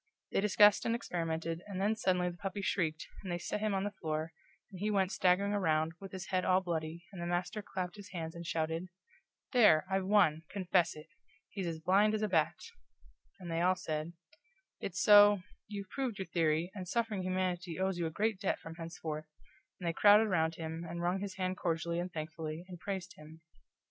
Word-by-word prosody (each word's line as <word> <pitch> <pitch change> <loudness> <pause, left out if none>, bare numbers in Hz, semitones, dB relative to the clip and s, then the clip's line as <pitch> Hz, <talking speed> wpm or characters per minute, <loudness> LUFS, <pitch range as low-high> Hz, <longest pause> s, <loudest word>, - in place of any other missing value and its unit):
They - - +2
discussed 205 0 +6
and 230 - +1
experimented, 165 -5 -3
and 195 -2 -5
then 210 +3 +2
suddenly 180 -4 +1
the 175 - -12
puppy 195 +1 -4
shrieked, 160 -5 0 0.2
and 185 - -5
they 175 - 0
set 175 - -3
him 210 -1 0
on 190 - 0
the 205 - -2
floor, 160 -4 -3 0.4
and 185 - -9
he 210 +3 0
went 195 -2 +2
staggering 190 +2 +2
around, 160 -5 +1
with 195 -1 -9
his 190 -1 -7
head 185 -1 +1
all 185 0 +4
bloody, 170 -2 -4
and 180 - -7
the 170 - -3
master 175 +4 -1
clapped 185 -1 -5
his 205 -1 -10
hands 165 -3 -5
and 170 - -7
shouted: 165 +2 -1 0.6
"There, 210 - +6
I've 190 -1 0
won 185 -7 +4
confess 185 -3 +1
it! 155 0 -10 0.4
He's 195 -3 -4
as 165 -1 -3
blind 205 +5 +4
as 215 - -1
a - - +2
bat!" 165 -6 +2 0.8
And 175 -2 -7
they 165 0 0
all 185 +1 +4
said: 160 -2 -4 0.7
"It's 190 -1 -4
so 205 -2 +7 0.2
you've 200 -2 -7
proved 260 -6 -2
your 190 - -3
theory, 165 0 +1
and 185 -3 -6
suffering 225 -1 -1
humanity 180 -2 -2
owes 190 -1 0
you 170 - 0
a - - -2
great 210 +4 0
debt 200 - 0
from 165 - -9
henceforth," 160 -2 -5 0.5
and 175 - -4
they 165 - +1
crowded 205 +4 +7
around 165 -5 +1
him, 160 0 -5
and 170 0 -5
wrung 180 +2 +1
his 200 0 -5
hand 185 -1 -2
cordially 170 -2 -1
and 180 +1 -3
thankfully, 155 0 -5
and 180 -2 -9
praised 190 -1 -4
him. 155 +2 -13
180 Hz, 205 wpm, -33 LUFS, 165-200 Hz, 0.8 s, so